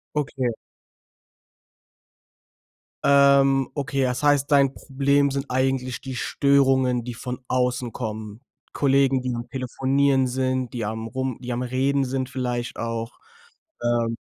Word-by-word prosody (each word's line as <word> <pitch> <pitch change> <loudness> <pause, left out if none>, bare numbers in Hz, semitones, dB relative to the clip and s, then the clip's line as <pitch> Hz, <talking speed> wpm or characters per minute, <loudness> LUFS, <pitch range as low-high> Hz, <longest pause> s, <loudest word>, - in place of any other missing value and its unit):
Okay. 135 -3 -1 2.5
Ähm, 140 -1 +5
okay. 140 -1 -2
Das 125 +2 -1
heißt, 145 -1 +3
dein 140 -2 +4
Problem 140 +1 +1
sind 140 +1 -2
eigentlich 130 -1 -1
die 130 -1 -6
Störungen, 130 -2 +2
die 125 - -5
von 125 +1 -6
außen 125 -1 0
kommen. 110 -2 -6 0.3
Kollegen, 135 -1 +3
die 125 -1 -2
am 120 0 -5
Telefonieren 135 +1 +1
sind, 130 -1 -1
die 120 -3 -3
am 110 +1 -4
rum 130 0 -3
die 125 -1 -5
am 120 +1 -2
Reden 135 +2 +1
sind, 130 0 -2
vielleicht 125 -3 -3
auch, 115 0 -4 0.7
ähm 120 -1 0
130 Hz, 125 wpm, -24 LUFS, 125-135 Hz, 2.5 s, Ähm